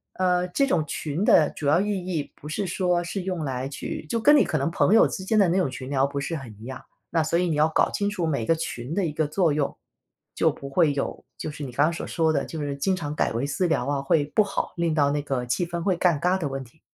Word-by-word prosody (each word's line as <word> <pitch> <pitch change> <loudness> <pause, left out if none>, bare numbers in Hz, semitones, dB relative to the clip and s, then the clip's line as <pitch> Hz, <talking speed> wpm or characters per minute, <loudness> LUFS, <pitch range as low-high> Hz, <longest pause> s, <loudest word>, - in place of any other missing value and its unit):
呃， 180 -1 +2
这 275 +9 +1
种 160 - +1
群 155 +5 -3
的 155 -7 +5
主 150 - -7
要 155 +5 +4
意 205 +2 0 0.2
义 165 -6 -3
不 150 - -10
是 190 +5 -2
说 180 -1 +1
是 190 +2 -3
用 180 -4 -3
来 130 0 -3
去 145 - -6
就 230 - -1
跟 295 +6 +6
你 - - +6
可 155 - -1
能 140 +3 0
朋 185 +4 +2
友 225 - +7
之 190 - -5
间 215 +2 +2
的 195 - +5
那 175 +3 +1
种 180 - +2
群 130 +1 -7
聊 135 -1 +2
不 140 0 -4
是 165 +4 -3
很 130 -7 -8
一 115 - -11
样， 130 0 -7 0.3
那 165 -2 +1
所 165 +2 +1
以 180 - +1
你 155 - 0
要 150 +1 +4
搞 160 - +2
清 205 0 0
楚 185 -5 -2
每 140 -8 -1
个 165 - +3
群 150 -3 -5
的 195 -3 +1
一 155 - -2
个 155 -1 0
作 160 -1 +2
用。 145 -2 -1 0.6
就 - - +3
不 140 - -7
会 150 +2 +3
有 140 - -3
就 155 - -4
是 150 -1 -7
你 130 - -5
刚 145 +5 +3
才 165 +1 0
所 - - -5
说 160 -2 +1
的， 140 - +1
就 160 - -6
是 145 -1 -3
经 185 +7 +1
常 150 -4 -4
改 - - 0
为 120 +5 -1
私 175 +5 0
聊 160 -6 0
啊， 140 -1 0
会 145 +2 +2
不 215 - +6
好， 200 -1 -3
令 170 -1 +1
到 145 -2 +3
那 145 0 0
个 135 -4 -2
气 125 +8 0
氛 170 0 -4
会 190 -1 +2
尴 170 -4 +2
尬 180 +4 +1
的 160 - -1
问 135 -1 -4
题。 130 +6 -20
160 Hz, 310 characters per minute, -25 LUFS, 140-180 Hz, 0.6 s, 友